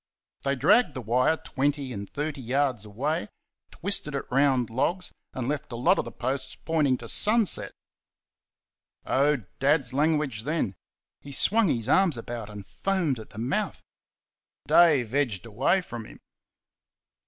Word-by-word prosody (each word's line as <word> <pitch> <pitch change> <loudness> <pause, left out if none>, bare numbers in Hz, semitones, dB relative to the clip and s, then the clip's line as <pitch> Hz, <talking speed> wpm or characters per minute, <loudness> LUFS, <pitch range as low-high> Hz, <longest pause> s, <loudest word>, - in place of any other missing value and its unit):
They 140 0 0
dragged 200 - +4
the 130 - -4
wire 125 +8 +2
twenty 140 -2 -2
and 100 -2 -6
thirty 150 -1 -4
yards 130 -3 0
away, 145 - -2 0.4
twisted 165 -6 +1
it 140 - -3
round 130 -3 +2
logs, 170 +9 -1 0.2
and 125 -2 -4
left 145 -2 -3
a - - -4
lot 135 +11 +3
of - - -1
the - - -7
posts 130 +2 -3
pointing 150 -6 +1
to 120 - -10
sunset. 215 - +2 1.3
Oh, 145 +2 +2 0.2
Dad's 135 -2 +2
language 150 -5 +1
then! 145 - -2 0.4
He 140 - -11
swung 215 +9 +2
his 115 -7 -1
arms 165 -1 +3
about 115 -2 -6
and 105 -2 -9
foamed 175 - -1
at 110 - -11
the - - -14
mouth. 135 - -2 0.8
Dave 145 -9 +5
edged 120 -11 0
away 125 - +1
from 120 -9 -8
him. - - -13
140 Hz, 145 wpm, -26 LUFS, 120-155 Hz, 1.3 s, Dave